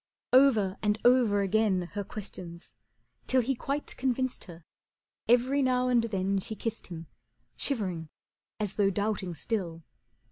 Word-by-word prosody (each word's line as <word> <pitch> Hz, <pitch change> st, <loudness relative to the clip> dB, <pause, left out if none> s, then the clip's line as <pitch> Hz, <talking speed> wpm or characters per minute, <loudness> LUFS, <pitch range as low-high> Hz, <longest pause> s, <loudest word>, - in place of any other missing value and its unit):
Over 225 Hz, -8 st, +5 dB
and 210 Hz, 0 st, +1 dB
over 240 Hz, -5 st, +5 dB
again 195 Hz, -2 st, +2 dB
her 205 Hz, -1 st, -3 dB
questions, 185 Hz, -4 st, -9 dB, 0.5 s
till 260 Hz, -1 st, +3 dB
He 270 Hz, +4 st, +1 dB
quite 280 Hz, +3 st, -3 dB
convinced 260 Hz, 0 st, -1 dB
her, 170 Hz, -3 st, -12 dB, 0.6 s
every 255 Hz, +4 st, +4 dB
now 255 Hz, -1 st, +2 dB
and 240 Hz, -2 st, +3 dB
then 195 Hz, -2 st, 0 dB
She 220 Hz, +3 st, -4 dB
kissed 225 Hz, +1 st, -4 dB
him, 165 Hz, -2 st, -7 dB, 0.5 s
shivering 185 Hz, -, -2 dB, 0.5 s
as 210 Hz, -3 st, -3 dB
though 200 Hz, -2 st, +4 dB
doubting 200 Hz, -3 st, -2 dB
still. 170 Hz, -4 st, -3 dB
210 Hz, 135 wpm, -29 LUFS, 190-250 Hz, 0.6 s, Over